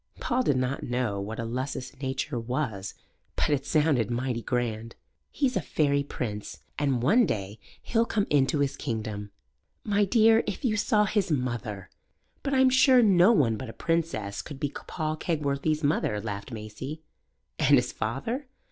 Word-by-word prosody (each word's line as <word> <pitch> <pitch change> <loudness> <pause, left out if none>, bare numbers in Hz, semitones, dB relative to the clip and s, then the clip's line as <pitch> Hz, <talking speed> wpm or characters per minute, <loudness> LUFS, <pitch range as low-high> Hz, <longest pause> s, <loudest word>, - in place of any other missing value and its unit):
Paul 250 +1 0
did 145 - +2
not 130 +2 -1
know 120 -5 -1
what 110 +3 -5
a - - -1
lusus 130 +2 -4
naturae 130 0 -3
was, 115 -6 -3 0.4
but - - +1
it 140 -1 0
sounded 145 -7 +2
mighty 120 0 -1
grand. 115 -2 -2 0.3
"He's 270 -3 0
a - - +1
fairy 140 -2 +1
prince, 110 -7 -5 0.2
and 135 -5 +1
one 225 - +5
day 100 +1 -3 0.2
he'll 230 0 +1
come 205 -2 +1
into 145 0 +3
his 140 -1 0
kingdom." 110 -5 -4 0.5
"My 205 -1 +2
dear, 225 +2 +5
if 205 +4 -3
you 220 -3 +2
saw 210 0 +3
his 205 -2 0
mother!" 120 - -3 0.5
"But 275 -1 -1
I'm 260 0 +5
sure 260 -1 +6
no 190 -1 +6
one 125 - +3
but 130 0 -6
a - - -8
princess 165 - -1
could 145 -3 -9
be 145 -1 -1 0.2
Paul 155 0 -2
Kegworthy's 155 -1 -1
mother," 140 -7 +1
laughed 100 +1 -5
Maisie. 115 +8 -7 0.6
"And - - +5
his - - +2
father?" 225 - -3
140 Hz, 165 wpm, -27 LUFS, 115-175 Hz, 0.6 s, sure